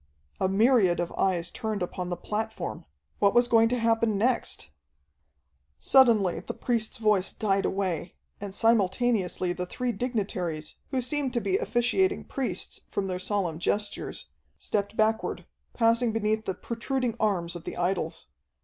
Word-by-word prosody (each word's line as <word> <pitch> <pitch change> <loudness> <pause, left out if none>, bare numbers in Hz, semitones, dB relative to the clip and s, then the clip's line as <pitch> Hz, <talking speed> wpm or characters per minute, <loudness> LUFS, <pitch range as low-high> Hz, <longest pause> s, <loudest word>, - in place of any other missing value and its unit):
A 190 - +2
myriad 200 -3 +4
of 175 -1 -2
eyes 180 -2 0
turned 215 -5 -3
upon 180 0 -4
the 175 - -2
platform! 215 - -4 0.3
What 200 +1 +3
was 240 0 +5
going 225 -1 +5
to 250 - 0
happen 225 -2 +2
next? 230 - 0 1.1
Suddenly 230 -9 +4
the - - -6
priest's 235 0 -1
voice 210 -4 +2
died 195 -2 0
away, 185 -3 -2 0.2
and 200 -1 -6
simultaneously 205 -4 +2
the 180 0 -4
three 250 +6 -2
dignitaries, 195 -9 -3 0.2
who 260 - 0
seemed 270 0 -1
to 240 - +1
be 380 +9 +1
officiating 375 - +1
priests, 245 -10 -3
from 200 - -2
their 185 -1 -3
solemn 185 -4 -1
gestures, 205 - -2 0.3
stepped 200 - -2
backward, 220 0 +1 0.3
passing 230 0 +3
beneath 220 0 0
the 190 - -2
protruding 240 +2 -2
arms 180 -5 0
of 170 - -8
the - - -6
idols. 175 -2 -1
215 Hz, 145 wpm, -27 LUFS, 185-235 Hz, 1.1 s, was